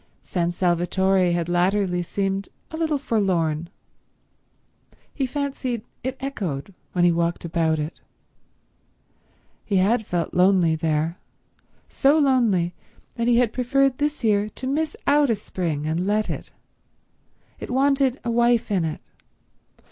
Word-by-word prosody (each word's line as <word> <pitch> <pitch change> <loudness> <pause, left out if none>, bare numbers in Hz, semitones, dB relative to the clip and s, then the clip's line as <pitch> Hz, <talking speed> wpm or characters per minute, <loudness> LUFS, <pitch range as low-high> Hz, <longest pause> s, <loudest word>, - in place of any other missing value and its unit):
San 175 -2 -1
Salvatore 180 +1 +2
had 170 -1 -1
latterly 180 +1 +1
seemed 195 +2 -2 0.2
a - - -5
little 320 -2 0
forlorn. 170 - 0 1.4
He 270 -3 -1
fancied 265 -4 -3 0.2
it 260 +1 -3
echoed 200 - -4 0.2
when 175 -1 +3
he 175 - +5
walked 170 0 -1
about 165 -1 +1
it. 150 +2 -5 1.6
He 205 - -2
had 210 +5 +3
felt 175 -4 -2
lonely 180 -3 +4
there; 160 +1 -1 0.7
so 280 +3 +3
lonely 235 - +2 0.4
that 235 0 -2
he 240 -1 +4
had 240 -2 +2
preferred 265 +1 +1
this 295 -1 -1
year 210 -1 +2
to 255 - -8
miss 300 +3 -1
out 290 -1 +4
a 230 - +3
spring 170 -7 -3
and 165 +4 -1
let 210 +1 +1
it. - - -6 1.1
It - - -7
wanted 270 0 +2
a 235 - -1
wife 235 -1 +2
in 190 -4 +2
it. 160 -1 -3
200 Hz, 135 wpm, -23 LUFS, 175-255 Hz, 1.6 s, he